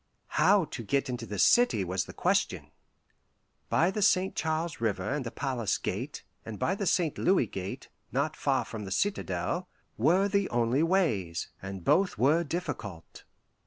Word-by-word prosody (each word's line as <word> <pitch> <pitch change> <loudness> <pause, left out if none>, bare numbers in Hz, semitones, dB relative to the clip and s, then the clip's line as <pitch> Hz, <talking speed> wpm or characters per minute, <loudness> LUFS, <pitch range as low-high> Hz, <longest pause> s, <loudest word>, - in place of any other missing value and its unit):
How 200 -4 +4
to 130 - -7
get 135 +4 0
into 120 -2 -4
the 105 +1 -5
city 110 - +4
was 95 0 -1
the - - -9
question. - - 0 1.0
By 170 +3 +3
the 210 - -3
St. 190 -2 +3
Charles 160 -3 -2
River 100 -5 -1
and 145 0 -1
the 120 - -4
Palace 120 -4 -1
Gate, 125 +10 -4 0.2
and 110 -2 -7
by 130 - 0
the 200 0 -2
St. 165 -3 +1
Louis 185 -7 +3
Gate, 95 -2 -6 0.2
not - - 0
far - - 0
from 105 -2 -6
the 95 - -7
citadel, 175 - -1 0.3
were 175 - +4
the 200 -1 +1
only 120 +3 +1
ways, 155 - +1
and 95 -2 -7
both 195 -8 +3
were 145 +9 +3
difficult. 140 - -6
135 Hz, 160 wpm, -29 LUFS, -, 1.0 s, How